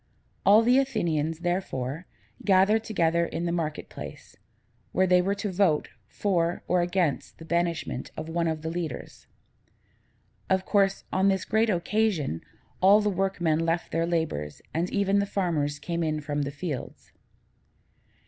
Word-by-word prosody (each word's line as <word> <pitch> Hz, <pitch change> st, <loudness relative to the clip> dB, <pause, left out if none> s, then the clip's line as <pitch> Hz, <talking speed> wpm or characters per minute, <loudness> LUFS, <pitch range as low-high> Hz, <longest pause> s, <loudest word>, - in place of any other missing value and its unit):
All 210 Hz, +3 st, +7 dB
the 250 Hz, +3 st, +5 dB
Athenians, 165 Hz, -, -1 dB
therefore, 170 Hz, -4 st, -2 dB, 0.4 s
gathered 200 Hz, +3 st, +4 dB
together 170 Hz, -6 st, +1 dB
in 170 Hz, 0 st, -3 dB
the 170 Hz, -, 0 dB
market 160 Hz, -3 st, -2 dB
place, -, -, -10 dB, 0.6 s
where 185 Hz, -, +3 dB
they 180 Hz, -1 st, +5 dB
were 195 Hz, +2 st, 0 dB
to 205 Hz, 0 st, -3 dB
vote 180 Hz, -5 st, +2 dB, 0.2 s
for 175 Hz, -4 st, 0 dB
or 180 Hz, -1 st, +3 dB
against 175 Hz, -4 st, -1 dB
the 165 Hz, -, -11 dB
banishment 170 Hz, -6 st, -1 dB
of 155 Hz, -, -5 dB
one 165 Hz, +1 st, 0 dB
of 160 Hz, -1 st, -2 dB
the 160 Hz, -, -2 dB
leaders. 170 Hz, -2 st, -6 dB, 1.2 s
Of 190 Hz, 0 st, +2 dB
course, 195 Hz, -2 st, +2 dB
on 190 Hz, +1 st, +3 dB
this 190 Hz, -1 st, +1 dB
great 220 Hz, +1 st, +2 dB
occasion, 180 Hz, -, 0 dB, 0.4 s
all 195 Hz, +3 st, +7 dB
the 210 Hz, -1 st, +1 dB
workmen 180 Hz, -5 st, 0 dB
left 165 Hz, +1 st, -1 dB
their 165 Hz, 0 st, 0 dB
labors, 160 Hz, -, -2 dB
and 170 Hz, +3 st, 0 dB
even 200 Hz, 0 st, +2 dB
the 200 Hz, -, 0 dB
farmers 160 Hz, -8 st, -1 dB
came 170 Hz, +3 st, -3 dB
in 155 Hz, -1 st, 0 dB
from 145 Hz, 0 st, -2 dB
the 140 Hz, 0 st, -2 dB
fields. 150 Hz, -2 st, -6 dB
175 Hz, 150 wpm, -27 LUFS, 160-195 Hz, 1.2 s, All